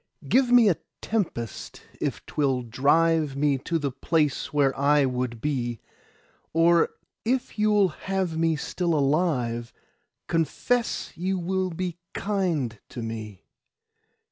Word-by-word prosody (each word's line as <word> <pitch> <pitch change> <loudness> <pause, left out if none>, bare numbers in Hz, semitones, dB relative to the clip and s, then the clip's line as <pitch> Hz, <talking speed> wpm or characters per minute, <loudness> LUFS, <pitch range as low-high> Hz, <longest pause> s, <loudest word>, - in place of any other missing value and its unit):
Give 255 -1 +3
me 245 -3 +7
a 180 - +3 0.2
tempest 165 - -3 0.2
if - - -3
'twill 135 -4 0
drive 145 +5 +2
Me 140 -1 +2
to 165 +5 -1
the 145 -3 -2
place 150 +1 0
where 140 -2 +2
I 145 +1 +4
would 125 -2 -2
be; 120 -5 -1 0.7
Or 165 +1 +4 0.3
if 245 -1 -1
you'll 210 -2 +4
have 185 +1 -2
me 165 0 +2
still 170 +2 -1
alive, 135 -6 +1 0.5
Confess 200 - 0
you 190 +3 -1
will 185 +1 -1
be 175 0 -4 0.2
kind 170 - -1
to 120 - -6
me. 110 -3 -6
160 Hz, 120 wpm, -26 LUFS, 130-185 Hz, 0.7 s, me